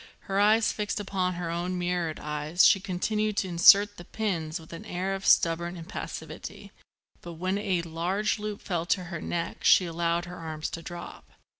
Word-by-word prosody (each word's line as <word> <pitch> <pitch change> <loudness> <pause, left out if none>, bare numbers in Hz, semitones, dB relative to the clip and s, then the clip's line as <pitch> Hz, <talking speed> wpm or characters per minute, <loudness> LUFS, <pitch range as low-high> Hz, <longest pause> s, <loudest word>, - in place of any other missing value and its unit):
Her 195 0 -2
eyes 215 +2 +4
fixed 210 0 -3
upon 185 -3 -1
her 175 -1 -3
own 175 +2 -2
mirrored 175 -3 -2
eyes, 150 +3 +1
she 195 - +6
continued 210 +3 -1
to 205 - +1
insert 200 +4 +6
the 175 - -9
pins 175 -5 -3
with 160 +1 -13
an 165 - -8
air 185 +2 -3
of 195 0 -4
stubborn 170 +1 +3
impassivity; 170 +5 -7 0.5
but 175 - -8
when 185 +4 -2
a 190 -5 0
large 180 +7 -1
loop 210 -1 -5
fell 170 -3 -2
to 185 0 +1
her 170 - -4
neck 170 -1 -4
she 185 - +6
allowed 170 0 -1
her 180 0 -9
arms 155 -1 -5
to 165 - -5
drop. 175 +1 -9
180 Hz, 180 wpm, -28 LUFS, 170-195 Hz, 0.5 s, she